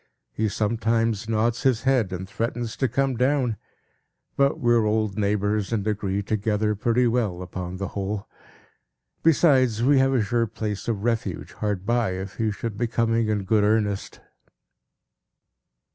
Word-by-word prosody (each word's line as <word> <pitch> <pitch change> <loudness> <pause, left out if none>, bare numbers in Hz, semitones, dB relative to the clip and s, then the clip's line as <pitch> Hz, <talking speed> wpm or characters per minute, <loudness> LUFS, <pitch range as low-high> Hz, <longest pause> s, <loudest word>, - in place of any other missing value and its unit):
"He 110 0 -1
sometimes 115 +1 0
nods 115 +1 +1
his 130 -4 +2
head, 130 -7 +2
and 95 +1 -5
threatens 115 +2 -3
to 130 - +1
come 135 0 0
down; 125 -2 +1 0.8
but 140 +1 +2
we 120 -1 +3
are 115 -1 +4
old 110 -2 0
neighbors, 105 0 0
and 105 -3 -1
agree 100 -2 -1
together 105 0 0
pretty 120 +4 +1
well, 110 -7 0
upon 90 0 -6
the 95 0 -4
whole. 100 +1 -4 0.9
Besides, 130 -8 +3
we 140 +1 +5
have 135 0 +3
a 120 - +3
sure 115 +3 0
place 105 -1 -4
of 105 -4 -2
refuge, 115 -1 -2
hard 105 -3 -3
by, 115 -4 +1
if 95 +1 -6
he 110 -1 0
should 105 +1 -5
be 120 - +1
coming 115 0 +1
in 105 -2 0
good 105 +2 +2
earnest." 105 -2 0
110 Hz, 155 wpm, -24 LUFS, 100-120 Hz, 0.9 s, we